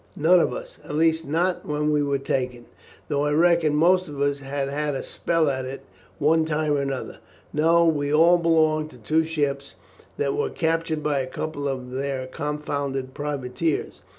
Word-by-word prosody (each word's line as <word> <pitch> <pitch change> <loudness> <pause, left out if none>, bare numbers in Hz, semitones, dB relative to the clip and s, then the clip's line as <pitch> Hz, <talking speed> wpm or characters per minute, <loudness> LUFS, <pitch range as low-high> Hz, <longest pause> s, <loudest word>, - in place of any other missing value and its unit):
"None 170 +4 +5
of - - +2
us, - - -8
at 150 - -6
least 160 0 +2
not 175 +5 0
when 150 0 -1
we 150 -1 +2
were 140 -1 +1
taken, 125 -3 -3 0.4
though 145 -1 0
I 145 - +1
reckon 165 -1 +3
most 180 +4 +4
of 145 -2 -8
us 140 0 +1
have 135 0 -3
had 145 +1 -2
a - - -3
spell 165 -2 0
at 130 -2 -1
it 130 +1 -7 0.3
one 160 +2 +3
time 155 -1 -1
or 140 -1 0
other. 135 - -6 0.3
No; 165 +3 +4
we 145 -3 +1
all 170 +3 +5
belong 155 -2 +2
to 125 - -15
two 155 +8 +1
ships 145 -3 -2 0.4
that 140 -1 0
were - - 0
captured 160 -2 -1
by 145 -2 +1
a 130 - -2
couple 145 +1 -4
of 130 -2 -4
their 135 0 -3
confounded 140 -1 -3
privateers. 145 +1 -3
150 Hz, 180 wpm, -24 LUFS, 140-160 Hz, 0.4 s, None